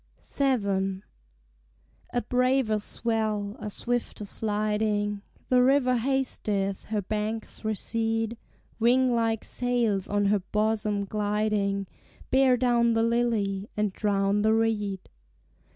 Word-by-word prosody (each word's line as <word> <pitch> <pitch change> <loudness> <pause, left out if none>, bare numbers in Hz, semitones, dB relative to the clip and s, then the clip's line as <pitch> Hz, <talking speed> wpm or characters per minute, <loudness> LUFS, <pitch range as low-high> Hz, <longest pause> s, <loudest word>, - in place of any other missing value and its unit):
VII. 200 -8 0 1.1
A 245 - 0
braver 250 -3 +2
swell, 215 -2 -2
a 210 - -5
swifter 240 -1 -3
sliding; 210 -1 -1 0.3
The 250 -1 +5
river 255 -1 +4
hasteth, 220 -6 -1
her 210 -2 -2
banks 215 +3 -4
recede; 225 +1 -1 0.4
Wing 250 +2 +4
like 225 -2 0
sails 235 -6 0
on 205 0 +1
her 205 +1 +3
bosom 210 +1 0
gliding 205 -1 0 0.5
Bear 265 -1 +5
down 235 -1 +3
the 225 0 +2
lily, 225 -4 0
and 210 -2 0
drown 200 0 +1
the 220 +1 +3
reed. 210 -4 -1
215 Hz, 105 wpm, -27 LUFS, 205-235 Hz, 1.1 s, The